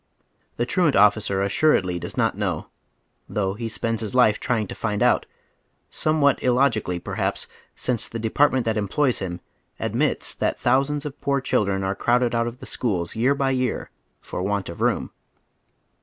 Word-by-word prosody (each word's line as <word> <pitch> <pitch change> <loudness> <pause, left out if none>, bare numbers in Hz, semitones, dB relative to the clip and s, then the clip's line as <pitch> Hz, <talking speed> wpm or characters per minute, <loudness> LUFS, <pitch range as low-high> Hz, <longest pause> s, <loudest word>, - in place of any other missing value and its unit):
The 120 - +1
truant 155 +3 +2
officer 105 -2 +3
assuredly 100 - +2
does - - -7
not - - +2
know, - - -2 0.6
though 95 -2 0
lie 115 +4 -4
spends 115 +1 -2
liis 110 +2 -4
life 110 -5 +4
trying 120 -4 0
to - - -7
find 105 -2 -1
out, - - +3 0.6
somewhat 155 -2 +2
illogically, 120 -8 +2
perhaps, - - -3 0.3
since 125 -3 0
the 115 - -6
department 130 +3 +2
that 110 -1 0
employs 120 +6 +1
him 90 -2 -5 0.4
admits - - 0
that - - -1
thousands 140 +4 +1
of 145 -2 -7
poor 140 0 +1
children 100 -7 0
are 95 0 0
crowded 120 +3 +1
out 115 0 +1
of 120 +1 -6
the - - -9
schools 90 -9 -2
year 125 +5 +2
by 135 -1 +1
year 130 -2 -1 0.3
for - - -5
want 100 -1 -1
of 85 - -8
room. - - 0
115 Hz, 165 wpm, -23 LUFS, 100-130 Hz, 0.6 s, life